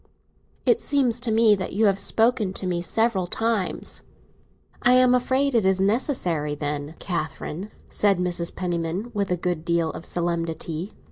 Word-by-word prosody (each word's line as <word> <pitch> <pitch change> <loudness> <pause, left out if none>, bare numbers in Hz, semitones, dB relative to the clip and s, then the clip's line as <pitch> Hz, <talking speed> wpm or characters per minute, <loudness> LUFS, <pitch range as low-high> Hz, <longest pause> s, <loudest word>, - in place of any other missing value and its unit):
"It 465 - +3
seems 255 -5 +1
to 240 -2 0
me 220 -1 +5
that 190 -2 -2
you 215 +3 +2
have 195 -1 +3
spoken 220 -1 +2
to 190 - -5
me 175 -1 -1
several 205 -1 +1
times." 225 -1 -1 0.8
"I 245 - +5
am 255 0 +5
afraid 260 +2 +2
it 230 -3 +3
is 190 0 +2
necessary, 190 - 0
then, 145 +1 -3
Catherine," 170 +2 -4 0.2
said 200 -2 +2
Mrs. 175 -1 -1
Penniman, 175 +4 -3
with 200 -2 -1
a 180 - +1
good 175 -2 -2
deal 170 -1 +1
of - - -9
solemnity. 170 0 -3
190 Hz, 155 wpm, -24 LUFS, 170-225 Hz, 0.8 s, me